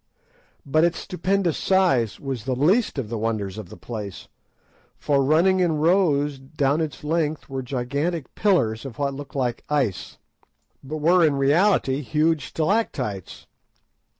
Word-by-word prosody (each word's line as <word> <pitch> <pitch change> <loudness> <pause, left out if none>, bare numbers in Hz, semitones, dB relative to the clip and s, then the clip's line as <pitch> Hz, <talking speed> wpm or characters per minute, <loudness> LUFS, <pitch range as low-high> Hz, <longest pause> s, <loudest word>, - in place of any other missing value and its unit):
But 155 +3 +2
its 170 0 +2
stupendous 185 -1 -1
size 135 - +2
was 135 -6 -5
the 130 -1 -1
least 180 - +2
of 130 -5 -2
the 115 -1 -3
wonders 110 -3 -2
of 100 -5 -9
the - - -11
place, 105 -5 -7 0.7
for 140 -2 +1
running 170 +7 +3
in 175 -3 +2
rows 150 -4 +2
adown 140 +2 0
its 150 -3 -4
length 155 0 -1
were 135 -1 -4
gigantic 140 +5 -3
pillars 115 - +1
of 135 -4 -8
what 140 -1 -1
looked 140 0 -9
like 125 -3 -1
ice, 135 -10 -1 0.7
but 150 +4 -5
were, 170 +4 +4
in 150 -3 +3
reality, 140 0 +2
huge 155 +2 0
stalactites. 155 - -2
145 Hz, 145 wpm, -23 LUFS, 130-165 Hz, 0.7 s, were